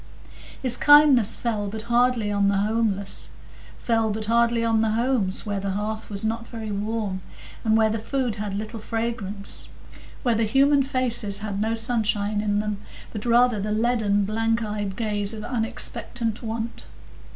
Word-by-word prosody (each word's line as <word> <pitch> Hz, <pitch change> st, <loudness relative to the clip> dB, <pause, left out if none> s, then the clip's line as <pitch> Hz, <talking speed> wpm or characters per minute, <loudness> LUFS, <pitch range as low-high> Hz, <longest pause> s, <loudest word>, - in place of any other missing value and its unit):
His 250 Hz, -2 st, +1 dB
kindness 290 Hz, -7 st, +6 dB
fell 215 Hz, -4 st, -2 dB
but 215 Hz, +2 st, -6 dB
hardly 235 Hz, -2 st, +2 dB
on 200 Hz, -1 st, +2 dB
the 200 Hz, 0 st, +2 dB
homeless,—fell 220 Hz, +2 st, -2 dB
but 215 Hz, +1 st, -3 dB
hardly 235 Hz, +1 st, +2 dB
on 225 Hz, -1 st, +2 dB
the 220 Hz, -1 st, +1 dB
homes 230 Hz, -5 st, 0 dB
where 205 Hz, -2 st, -2 dB
the 195 Hz, 0 st, -3 dB
hearth 215 Hz, +2 st, -4 dB
was 200 Hz, 0 st, -3 dB
not 225 Hz, +1 st, -2 dB
very 220 Hz, -2 st, -6 dB
warm, 205 Hz, -2 st, -3 dB, 0.4 s
and 220 Hz, -1 st, +3 dB
where 220 Hz, -1 st, +3 dB
the 225 Hz, -, -2 dB
food 245 Hz, -1 st, -2 dB
had 205 Hz, -1 st, -4 dB
little 215 Hz, +2 st, -5 dB
fragrance; 215 Hz, -3 st, -3 dB, 0.5 s
where 245 Hz, -3 st, +2 dB
the 225 Hz, 0 st, +1 dB
human 275 Hz, +5 st, +4 dB
faces 245 Hz, -6 st, 0 dB
had 215 Hz, -1 st, -4 dB
had 200 Hz, +1 st, -2 dB
no 220 Hz, +1 st, 0 dB
sunshine 215 Hz, -3 st, +1 dB
in 205 Hz, -1 st, 0 dB
them, 210 Hz, -1 st, -3 dB, 0.3 s
but 215 Hz, +1 st, -5 dB
rather 240 Hz, -1 st, +4 dB
the 210 Hz, +2 st, -2 dB
leaden, 215 Hz, -3 st, +1 dB
blank 225 Hz, +2 st, 0 dB
eyed 205 Hz, -2 st, -3 dB
gaze 210 Hz, -1 st, -1 dB
of 215 Hz, -, -7 dB
unexpectant 230 Hz, -1 st, -1 dB
want. 225 Hz, 0 st, -5 dB
220 Hz, 160 wpm, -24 LUFS, 205-235 Hz, 0.5 s, kindness